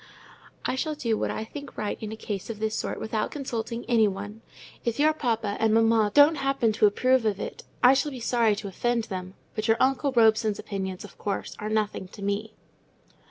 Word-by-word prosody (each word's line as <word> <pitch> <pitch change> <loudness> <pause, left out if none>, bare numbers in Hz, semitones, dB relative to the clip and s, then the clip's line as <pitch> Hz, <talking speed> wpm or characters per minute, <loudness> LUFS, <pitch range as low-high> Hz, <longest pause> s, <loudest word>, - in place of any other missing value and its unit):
"I - - +1
shall 305 +4 -2
do 235 -6 0
what - - -1
I - - -3
think 285 +5 -9
right 210 - -2
in 215 -1 -5
a - - -4
case 205 -2 -5
of 225 - -4
this 220 0 -1
sort - - -3
without 220 -1 -2
consulting 235 -4 -4
any 230 -3 +4
one. 205 +3 -6 0.4
If 235 -1 -1
your 310 +1 +5
papa 225 -8 -1
and 220 -1 +3
mamma 225 -1 +4
don't 290 +2 +7
happen 270 -5 +1
to 210 0 +4
approve 255 +4 +2
of 210 -3 0
it, - - -5 0.2
I 250 +2 +8
shall 285 +3 +1
be 265 -3 -7
sorry 230 -2 +2
to 205 - -6
offend 235 +5 0
them; 185 -2 -6 0.2
but 215 0 -2
your 225 0 +4
uncle 270 +2 +2
Robson's 220 -3 +3
opinions, 190 -2 -5
of 205 - -13
course, 200 - -3
are 210 - -3
nothing 215 -3 -1
to 200 +2 -11
me." 205 +2 -2
220 Hz, 205 wpm, -26 LUFS, 210-245 Hz, 0.4 s, I